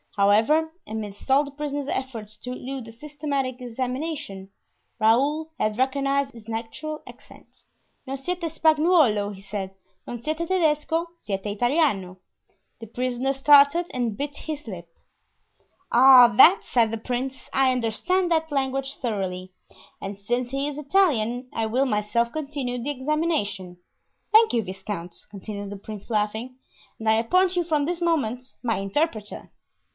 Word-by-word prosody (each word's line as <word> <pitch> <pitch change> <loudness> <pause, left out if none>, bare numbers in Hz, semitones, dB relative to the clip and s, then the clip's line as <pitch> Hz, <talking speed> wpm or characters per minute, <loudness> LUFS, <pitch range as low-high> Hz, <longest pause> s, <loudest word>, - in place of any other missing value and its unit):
However, 220 +11 +3 0.2
amidst 215 +2 -6
all 275 +2 +5
the 285 - -9
prisoner's 290 -1 -4
efforts 230 -7 -4
to 250 +3 -7
elude 255 -1 -6
a - - -9
systematic 280 -1 -4
examination, 250 -4 -4 0.5
Raoul 285 +8 +2
had 215 0 0
recognized 275 +1 +1
his 225 -2 -14
natural 230 +8 -5
accent. - - -15 0.6
"Non 270 +1 -3
siete 360 +7 -4
Spagnuolo," 310 - +3
he 190 - -12
said; 195 -1 -5 0.3
"non 240 -1 -6
siete 310 +4 -3
Tedesco; 325 -1 +1
siete 195 -1 -4
Italiano." 210 - +1 0.6
The 225 - -9
prisoner 250 +3 -1
started 285 +4 +5
and 240 -4 -2
bit 290 +1 -4
his 300 -4 -6
lips. 175 -5 -8 1.0
"Ah, 255 0 +9
that," 380 +10 +7
said 230 -3 +2
the 225 - -2
prince, 255 +3 -4
"I 265 -1 +4
understand 345 - 0
that 320 -1 +1
language 270 0 -1
thoroughly; 185 -5 -3 0.5
and 195 0 -5
since 240 +5 -2
he 275 +2 -1
is 295 -1 -5
Italian 270 - +1
I 225 -1 -1
will 255 +5 +1
myself 235 +1 0
continue 280 -5 -3
the 270 - -3
examination. 260 - -1 0.5
Thank 440 +1 +6
you, 230 -2 +1
viscount," 190 -2 -6
continued 200 0 -7
the 205 - -6
prince, 205 +1 -9
laughing, 220 +3 -2 0.4
"and 220 - -5
I 220 - +6
appoint 365 +12 +2
you 350 - +2
from 305 -3 0
this 350 +2 -3
moment 270 -8 0 0.2
my 230 -2 0
interpreter." 210 +2 -2
255 Hz, 140 wpm, -25 LUFS, 215-295 Hz, 1.0 s, Ah